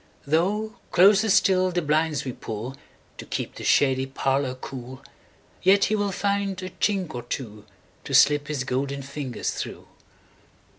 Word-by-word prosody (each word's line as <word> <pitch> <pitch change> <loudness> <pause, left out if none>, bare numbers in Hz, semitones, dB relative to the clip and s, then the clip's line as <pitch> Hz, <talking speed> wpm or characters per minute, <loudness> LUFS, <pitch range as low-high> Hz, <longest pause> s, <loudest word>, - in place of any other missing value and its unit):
Though 200 +9 0
closer 200 +4 +5
still 185 -1 +4
the 175 -1 -1
blinds 155 0 +1
we 130 - -3
pullTo 115 +6 -9
keep - - -3
the - - -9
shady 135 -1 +3
parlour 135 0 -1
cool, 130 0 -9 0.6
Yet 195 +2 +5
he 215 - +1
will 205 -1 0
find 200 0 -1
a 185 - -6
chink 190 -6 -1
or 120 - -4
twoTo 110 -4 -6 0.5
slip 145 0 +5
his 145 -4 -2
golden 140 +2 -2
fingers 135 -2 -4
through. - - -6
150 Hz, 140 wpm, -25 LUFS, 130-190 Hz, 0.6 s, closer